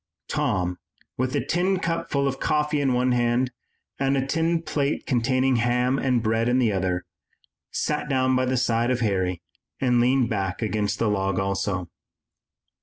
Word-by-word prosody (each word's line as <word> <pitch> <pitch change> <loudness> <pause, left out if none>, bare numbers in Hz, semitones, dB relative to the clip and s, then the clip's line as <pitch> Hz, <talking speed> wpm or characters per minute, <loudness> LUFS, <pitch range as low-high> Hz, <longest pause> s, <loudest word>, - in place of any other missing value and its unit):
Tom, 90 -1 -1 0.4
with 130 +1 -1
a - - 0
tin 185 +3 +1
cup 165 -1 -2
full 140 -1 +1
of 135 - -2
coffee 150 -1 +1
in 135 -2 +2
one 125 +1 +2
hand 120 +1 +1 0.5
and 135 0 +2
a 135 - 0
tin 165 +3 0
plate 145 -2 -1
containing 130 0 +2
ham 125 +3 +1
and 125 -4 +1
bread 115 +1 +1
in 125 - +3
the 120 -4 +3
other, 90 -2 -1 0.6
sat 150 0 -2
down 130 -1 +2
by 130 0 +2
the 130 0 0
side 120 -1 +1
of 125 -1 0
Harry 95 -5 0 0.4
and 125 -2 +3
leaned 125 0 +3
back 95 -3 -2
against 105 -2 -1
the 115 - +1
log 95 -2 0
also. 95 -1 -1
125 Hz, 170 wpm, -24 LUFS, 105-135 Hz, 0.6 s, in